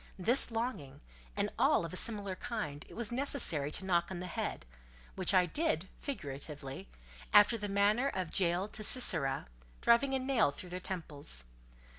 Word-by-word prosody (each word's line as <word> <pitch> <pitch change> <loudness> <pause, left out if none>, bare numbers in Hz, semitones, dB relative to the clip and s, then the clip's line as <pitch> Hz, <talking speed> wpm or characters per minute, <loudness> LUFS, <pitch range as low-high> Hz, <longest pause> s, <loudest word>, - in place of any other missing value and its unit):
This 235 +9 +5
longing, 225 - -4 0.4
and - - -1
all - - +3
of 165 - -8
a - - -5
similar 200 -2 +1
kind, 180 -10 -6
it - - -13
was 230 -1 -3
necessary 240 - +3
to 190 - -4
knock 175 -2 +1
on 185 -2 -6
the 180 - -6
head; 175 - -5 0.5
which - - +2
I 185 -1 +4
did, 190 - -1
figuratively, 140 - -7 0.4
after 205 +3 +6
the 210 -2 -4
manner 205 +6 +2
of 185 -10 -4
Jael 180 +1 0
to 215 - -6
Sisera, 140 - +3 0.3
driving 265 +3 +3
a - - +2
nail 255 - +1
through 180 +5 -10
their 180 +1 -5
temples. 150 - -4
190 Hz, 165 wpm, -32 LUFS, 160-235 Hz, 0.5 s, after